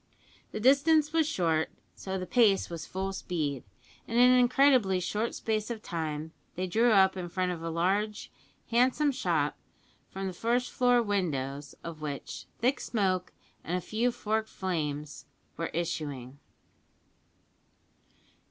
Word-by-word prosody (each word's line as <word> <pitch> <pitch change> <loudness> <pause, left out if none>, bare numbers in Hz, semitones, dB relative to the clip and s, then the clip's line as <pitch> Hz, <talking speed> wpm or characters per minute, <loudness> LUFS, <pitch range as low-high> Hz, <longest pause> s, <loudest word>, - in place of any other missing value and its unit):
The - - -4
distance 295 +5 +4
was 320 -2 +3
short, 165 - +1 0.2
so 190 0 -5
the 185 - -4
pace 200 -1 +3
was 165 -2 -6
full 190 +1 -3
speed, 150 -9 -3 0.4
and 230 - -2
in 250 +1 +7
an 255 - +6
incredibly 250 -6 +4
short 210 +6 -2
space 215 -1 -2
of 225 -2 -5
time 160 -2 -4 0.2
they 185 - -2
drew 225 +6 +3
up 190 -2 +5
in 180 -2 -5
front 185 +1 -1
of 170 -2 -5
a 165 - -3
large, 195 +6 -1 0.4
handsome 255 +5 +3
shop, 265 - 0 0.5
from 195 0 -5
the 190 - -3
first 240 +6 0
floor 245 -1 +3
windows 145 -9 -2
of 165 -2 -7
which 145 -2 -6
thick 255 +4 +1
smoke 185 -5 -1 0.3
and 175 +2 -1
a - - -1
few 225 +7 0
forked 220 -1 -2
flames 150 -5 -3 0.3
were 165 - -2
issuing. 145 -6 -4
190 Hz, 145 wpm, -29 LUFS, 165-235 Hz, 0.5 s, in